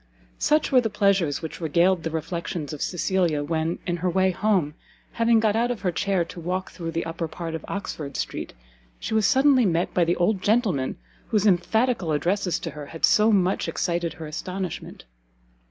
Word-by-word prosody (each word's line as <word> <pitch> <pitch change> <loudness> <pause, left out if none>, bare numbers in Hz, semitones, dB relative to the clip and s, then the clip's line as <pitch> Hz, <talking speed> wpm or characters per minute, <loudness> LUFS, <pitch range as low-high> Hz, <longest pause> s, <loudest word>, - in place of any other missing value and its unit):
Such 305 0 +2
were 255 -2 +6
the 225 - -1
pleasures 200 -8 +1
which 160 - -6
regaled 170 +3 +2
the 165 - -3
reflections 165 -1 -4
of 150 - -7
Cecilia 175 -4 0
when, 160 +2 -1
in 175 -1 -1
her 180 +2 -1
way 190 +1 +2
home, 185 -5 +1 0.4
having 230 0 +3
got 220 -1 +2
out 235 +2 +1
of 245 -3 -3
her 185 -3 0
chair 185 0 0
to 170 - -10
walk 180 +3 -3
through 165 -2 -6
the 165 0 -2
upper 165 0 -3
part 165 +1 -6
of 160 - -5
Oxford 155 -8 -5
Street, - - -4 0.5
she - - -4
was 220 -2 +3
suddenly 265 -1 +4
met 175 -3 +1
by 180 - +3
the 170 +1 +1
old 185 +2 +1
gentleman 205 - +1 0.3
whose 215 -2 +1
emphatical 210 0 +2
addresses 180 +4 0
to - - -4
her 150 -1 -8
had 165 - +1
so 215 +1 +4
much 190 -2 +2
excited 170 -2 -1
her 160 - -8
astonishment. 180 - -6
180 Hz, 185 wpm, -24 LUFS, 165-205 Hz, 0.5 s, were